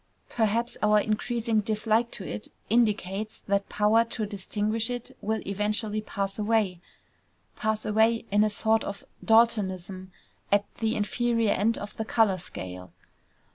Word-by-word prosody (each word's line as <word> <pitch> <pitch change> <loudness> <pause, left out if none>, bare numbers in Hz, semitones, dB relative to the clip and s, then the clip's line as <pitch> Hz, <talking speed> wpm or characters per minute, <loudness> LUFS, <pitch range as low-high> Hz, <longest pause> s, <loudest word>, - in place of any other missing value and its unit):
Perhaps 230 +1 0
our 210 0 +5
increasing 220 +1 0
dislike 220 +2 +1
to 195 - -5
it 105 +1 -5 0.2
indicates 215 -2 +1
that 200 0 -1
power 210 +2 +4
to 230 -1 -3
distinguish 210 +3 -1
it 245 -1 -6
will 220 +1 -1
eventually 210 +2 -1
pass 195 -1 -4
away 210 -5 +1 0.7
pass 220 -1 -1
away 225 +2 +2
in 205 +1 +4
a 215 - +2
sort 220 +2 +1
of 200 - -6 0.2
Daltonism 190 -5 +2 0.4
at 205 0 +4
the 225 0 0
inferior 230 +1 +1
end 225 +4 +1
of 205 - -7
the 220 - -2
color 215 -4 +2
scale. 90 - -8
215 Hz, 135 wpm, -27 LUFS, 200-225 Hz, 0.7 s, our